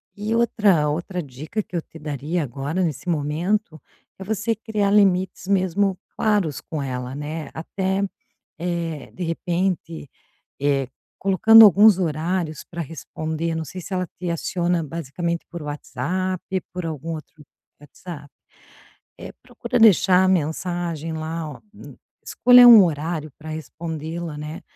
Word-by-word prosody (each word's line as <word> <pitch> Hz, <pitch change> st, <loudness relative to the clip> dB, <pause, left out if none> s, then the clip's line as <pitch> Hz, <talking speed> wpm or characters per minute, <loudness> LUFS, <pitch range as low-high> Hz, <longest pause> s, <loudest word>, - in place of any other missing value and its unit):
E 215 Hz, +2 st, -2 dB
outra 205 Hz, -9 st, +3 dB
outra 175 Hz, +4 st, -3 dB
dica 150 Hz, -, -5 dB
que 185 Hz, -, -11 dB
eu 170 Hz, -, 0 dB
te 160 Hz, -, -15 dB
daria 150 Hz, +3 st, -3 dB
agora, 145 Hz, +7 st, -3 dB
nesse 165 Hz, +1 st, -3 dB
momento, 165 Hz, +4 st, -1 dB, 0.4 s
é -, -, -6 dB
você 220 Hz, +3 st, -1 dB
criar 210 Hz, -2 st, -1 dB
limites 190 Hz, -3 st, +2 dB
mesmo 195 Hz, 0 st, +1 dB, 0.2 s
claros 205 Hz, -10 st, +1 dB
com 155 Hz, -3 st, -5 dB
ela, 125 Hz, -1 st, -4 dB
né. 150 Hz, +2 st, -5 dB
Até, 190 Hz, +4 st, -2 dB, 0.6 s
eh, 170 Hz, -3 st, -4 dB
de 185 Hz, -, -5 dB
repente, 170 Hz, -2 st, -2 dB, 0.5 s
eh, 140 Hz, -2 st, +1 dB, 0.3 s
colocando 220 Hz, +4 st, +8 dB
alguns 205 Hz, +1 st, +7 dB
horários 165 Hz, 0 st, -2 dB
para 170 Hz, -1 st, -5 dB
responder. 160 Hz, +1 st, -4 dB
Não 160 Hz, 0 st, -3 dB
sei 180 Hz, +6 st, -8 dB
se 185 Hz, +4 st, -7 dB
ela 185 Hz, -1 st, -1 dB
te 180 Hz, -, -3 dB
aciona 170 Hz, 0 st, -1 dB
basicamente 170 Hz, +2 st, -4 dB
por 170 Hz, -1 st, -7 dB
WhatsApp, 150 Hz, +6 st, -3 dB, 0.3 s
por 180 Hz, -1 st, -4 dB
algum 160 Hz, +1 st, -4 dB
outro 155 Hz, -1 st, -12 dB, 0.3 s
WhatsApp. 145 Hz, +1 st, -11 dB, 0.9 s
É, -, -, -8 dB
procura -, -, -3 dB
deixar 190 Hz, -4 st, +6 dB
a -, -, +3 dB
mensagem 170 Hz, -1 st, -1 dB
lá, 160 Hz, 0 st, -4 dB
ó, 140 Hz, -, -12 dB, 0.6 s
escolha 245 Hz, 0 st, +7 dB
um 225 Hz, -4 st, +10 dB
horário 155 Hz, 0 st, -3 dB
pra 155 Hz, 0 st, -10 dB
respondê-la, 160 Hz, +1 st, -6 dB
né, 150 Hz, +2 st, -7 dB
170 Hz, 135 wpm, -22 LUFS, 155-185 Hz, 0.9 s, um